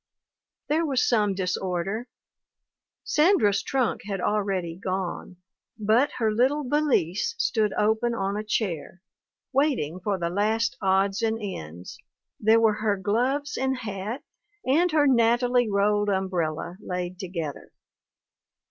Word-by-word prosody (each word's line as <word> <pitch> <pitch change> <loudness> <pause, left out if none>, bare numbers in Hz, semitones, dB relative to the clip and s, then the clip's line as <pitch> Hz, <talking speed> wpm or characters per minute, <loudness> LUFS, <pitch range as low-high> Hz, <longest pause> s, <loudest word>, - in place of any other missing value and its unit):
There 315 +3 +1
was 275 -5 +1
some 210 -5 +2
disorder; 185 +4 -2 1.0
Sandra's 300 - +3
trunk 255 -3 -1
had 200 -2 -3
already 190 -4 -1
gone, 185 -1 -4 0.4
but 225 +6 +2
her 220 -3 0
little 265 +6 +2
valise 295 - +1
stood 215 - +1
open 220 +3 +1
on 195 -2 -1
a 210 - -3
chair, 185 -4 -3 0.5
waiting 255 - +1
for 200 +1 -1
the 170 -1 -2
last 215 +1 +1
odds 195 +1 +2
and 225 -1 +1
ends; 90 - -7 0.4
there 220 +2 +5
were 225 -1 +4
her 210 -2 +1
gloves 250 +9 0
and 265 0 0
hat 215 +4 -5 0.4
and 325 +7 +3
her 305 -2 +4
nattily 245 -1 +3
rolled 205 +1 +2
umbrella 180 -3 -2
laid 180 -1 -4
together. 170 -6 -5
210 Hz, 120 wpm, -26 LUFS, 190-245 Hz, 1.0 s, there